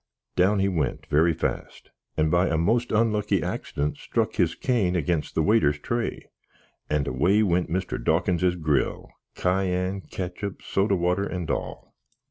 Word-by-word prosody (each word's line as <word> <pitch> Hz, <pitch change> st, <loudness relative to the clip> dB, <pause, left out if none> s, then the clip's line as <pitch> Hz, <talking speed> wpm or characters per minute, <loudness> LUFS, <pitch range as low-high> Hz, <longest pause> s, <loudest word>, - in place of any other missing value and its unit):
Down 100 Hz, +3 st, +3 dB
he 95 Hz, 0 st, +2 dB
went 80 Hz, -8 st, -1 dB
very 80 Hz, +3 st, +4 dB
fast, -, -, -4 dB, 0.3 s
and 80 Hz, 0 st, +2 dB
by 90 Hz, +2 st, +3 dB
a 80 Hz, -, +1 dB
most 115 Hz, +9 st, +1 dB
unlucky 105 Hz, -3 st, +2 dB
axdent 75 Hz, -1 st, -3 dB
struck -, -, -1 dB
his -, -, +2 dB
cane 105 Hz, -8 st, +1 dB
against 80 Hz, -2 st, -1 dB
the 80 Hz, -, +2 dB
waiter's 75 Hz, -8 st, +3 dB
tray, 115 Hz, +10 st, -3 dB, 0.6 s
and 75 Hz, -2 st, 0 dB
away 90 Hz, +12 st, +3 dB
went 90 Hz, -3 st, +1 dB
Mr. 90 Hz, +2 st, -2 dB
Dawkinses 90 Hz, +2 st, +2 dB
gril, 75 Hz, -5 st, -1 dB, 0.3 s
kayann, 90 Hz, +1 st, 0 dB
kitchup, 95 Hz, +2 st, -5 dB
soda 100 Hz, +1 st, +1 dB
water, 90 Hz, +3 st, 0 dB
and 90 Hz, -3 st, -3 dB
all! -, -, -5 dB
90 Hz, 145 wpm, -25 LUFS, 80-100 Hz, 0.6 s, very